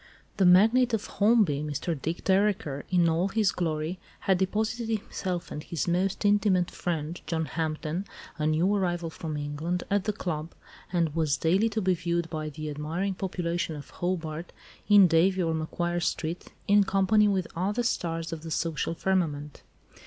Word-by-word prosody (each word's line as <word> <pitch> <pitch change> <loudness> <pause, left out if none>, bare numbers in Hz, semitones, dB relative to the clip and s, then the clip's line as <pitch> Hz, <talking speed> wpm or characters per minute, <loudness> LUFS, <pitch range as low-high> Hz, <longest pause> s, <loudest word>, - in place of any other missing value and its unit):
The 190 -3 +5
magnate 225 +7 +5
of 215 - -4
Holmby, 205 -9 +3
Mr. 150 +3 -2
Dick 160 +3 -4
Dereker, 190 -8 +1
in 175 -2 +3
all 165 +3 +2
his 210 -1 +2
glory, 160 +1 -2 0.2
had 190 -2 +2
deposited 220 +4 -1
himself 190 -4 -3
and 150 - -5
his 165 -1 -3
most 185 +4 0
intimate 200 -3 +3
friend, 165 -1 -3
John 160 -1 -1
Hampden, 160 +3 -3 0.3
a 150 - +1
new 165 +6 +2
arrival 175 -4 -1
from 155 -2 -5
England, 150 +5 -3
at 200 -1 +2
the 215 - +1
club, 165 -5 -4 0.4
and 170 -4 +1
was 155 -3 +1
daily 190 +7 +2
to 220 -1 -2
be 185 0 +3
viewed 170 -1 -2
by 155 -1 -3
the 155 0 -6
admiring 165 +7 -2
population 175 -3 -2
of 145 - -10
Hobart 170 -2 -3 0.4
in 205 -2 +8
Davey 180 +3 +3
or 165 -1 0
Macquarie 175 +2 -2
Street 170 0 -3 0.2
in 205 0 +6
company 195 +2 +3
with 190 -3 +1
other 205 +7 0
stars 165 -7 -2
of 160 - -6
the 165 - -7
social 165 0 -1
firmament. 155 -6 -1
175 Hz, 165 wpm, -28 LUFS, 160-195 Hz, 0.4 s, in